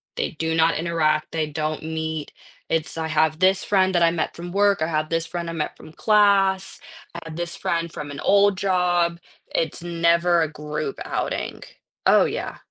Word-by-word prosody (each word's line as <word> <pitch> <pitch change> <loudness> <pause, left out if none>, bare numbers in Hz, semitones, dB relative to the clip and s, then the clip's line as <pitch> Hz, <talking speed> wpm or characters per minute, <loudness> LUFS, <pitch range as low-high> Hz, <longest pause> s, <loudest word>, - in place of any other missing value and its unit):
They - - -2
do 160 +1 -2
not 165 0 +3
interact, 155 -2 0
they 160 -2 -1
don't 155 +1 -3
meet. 160 -1 -4 0.4
It's 165 0 -1
I 160 0 -2
have 155 0 +2
this 190 +1 +3
friend 190 -2 +2
that 175 - +2
I 165 - +6
met 165 -2 -2
from 175 +1 -7
work, 200 -2 +2
I 160 - +1
have 155 -1 -1
this 165 0 0
friend 170 -1 -4
I - - -4
met 155 -2 -3
from 155 - -13
class, 200 -2 +3 0.3
I 170 - -6
have 160 -1 -8
this 175 0 -3
friend 170 -1 -2
from 145 -1 -6
an 140 - -7
old 200 -1 +4
job, 175 -3 +1 0.3
it's 170 +1 -1
never 170 0 +2
a 155 -1 -1
group 150 -1 -4
outing. - - -3 0.5
Oh, - - +6
yeah. - - -4
165 Hz, 190 wpm, -23 LUFS, 155-180 Hz, 0.5 s, I